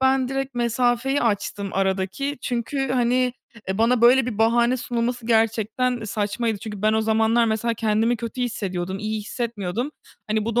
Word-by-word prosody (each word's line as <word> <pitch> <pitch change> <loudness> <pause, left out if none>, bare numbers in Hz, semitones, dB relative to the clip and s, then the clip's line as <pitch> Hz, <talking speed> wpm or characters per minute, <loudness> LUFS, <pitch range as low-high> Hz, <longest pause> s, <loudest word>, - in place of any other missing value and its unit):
ben 265 -1 +3
direkt 270 -1 -3
mesafeyi 245 +3 +1
açtım 205 -2 -1
aradaki 195 +9 -1
çünkü, 260 +3 -2
hani, 250 0 +2 0.4
eee, 190 +2 -2
bana 235 +1 +3
böyle 245 +1 +6
bir 225 -5 -4
bahane 235 +2 +3
sunulması 240 -1 -2
gerçekten 225 +1 +1
saçmaydı. 215 +1 -1
Çünkü 210 -2 -7
ben 215 0 +3
o 220 - +2
zamanlar 220 +1 +3
mesela 230 +1 0
kendimi 225 +2 +1
kötü 235 +2 -4
hissediyordum, 190 -5 -3
iyi 215 0 -3
hissetmiyordum. 230 +2 -3 0.4
Hani, 215 0 0
bu 230 0 -3
da - - +5
230 Hz, 160 wpm, -23 LUFS, 215-245 Hz, 0.4 s, böyle